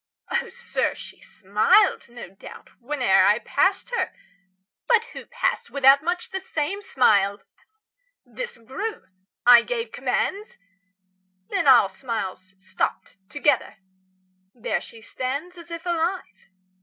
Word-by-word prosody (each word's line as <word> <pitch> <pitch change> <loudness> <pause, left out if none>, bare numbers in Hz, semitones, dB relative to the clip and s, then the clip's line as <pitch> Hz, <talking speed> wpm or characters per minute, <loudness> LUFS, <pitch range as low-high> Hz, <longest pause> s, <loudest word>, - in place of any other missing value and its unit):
Oh, 475 0 -1
sir, 480 0 -2
she - - -12
smiled, 215 - +2
no 240 0 -10
doubt, 195 - -13
Whene'er 245 -7 +2
I 210 +2 +4
passed 380 - 0
her; 480 - -1 0.8
but 465 -2 +3
who - - -9
passed - - -2
without 275 0 +5
Much 355 +2 -3
the 385 - -3
same 370 +1 -3
smile? 205 - +2 0.8
This - - -7
grew; 270 - -6 0.4
I 240 -1 +9
gave 470 - -4
commands; 410 +3 -2 0.9
Then - - -1
all 250 -6 +7
smiles 190 -3 -6
stopped 190 +1 -4
together.° 290 -4 +1 0.8
There 235 - -2
she 225 -1 -13
stands 280 +10 -4
°46 - - -10
As 340 0 -13
if 335 0 -7
alive. 340 - -3
280 Hz, 125 wpm, -24 LUFS, -, 0.9 s, I